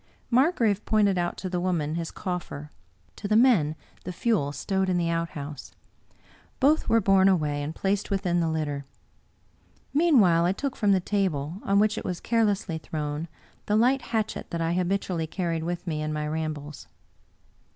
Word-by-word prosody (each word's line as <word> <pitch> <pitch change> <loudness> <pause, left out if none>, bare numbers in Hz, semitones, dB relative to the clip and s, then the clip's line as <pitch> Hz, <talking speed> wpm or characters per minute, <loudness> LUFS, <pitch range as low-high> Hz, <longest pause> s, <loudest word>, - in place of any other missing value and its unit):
Margrave 235 - +3
pointed 205 -4 +2
out 175 0 -2
to 190 - -4
the 180 -1 -2
woman 170 -4 -1
his 165 0 -3
coffer, 170 -6 -5 0.4
to 200 - -5
the 215 - +2
men 215 - +4 0.3
the 180 - -5
fuel 180 -7 0
stowed 190 +7 -1
in 180 - +1
the 170 -1 0
out 165 0 -1
house. 145 -1 -7 0.9
Both 295 +3 +3
were 230 - +5
borne 195 -1 +4
away 150 -6 +1
and 150 +3 -4
placed 200 +1 -1
within 185 -3 0
the 165 -1 +1
litten 145 -3 -2 1.1
Meanwhile 230 - +4
I 180 - +2
took 275 +5 -3
from 205 -3 +2
the 190 - +4
table, 180 -4 -1
on 195 0 +2
which 210 +1 +3
it - - -8
was 180 -1 -3
carelessly 205 -7 0
thrown, 150 0 -4 0.4
the 210 - +2
light 255 +5 +3
hatchet 220 -2 -3
that 170 - -3
I 165 +1 0
habitually 180 -2 -1
carried 165 -2 -2
with 175 +1 -4
me 155 -3 -2
in 155 0 -2
my 150 0 -2
rambles. 150 -2 -5
180 Hz, 170 wpm, -26 LUFS, 160-205 Hz, 1.1 s, were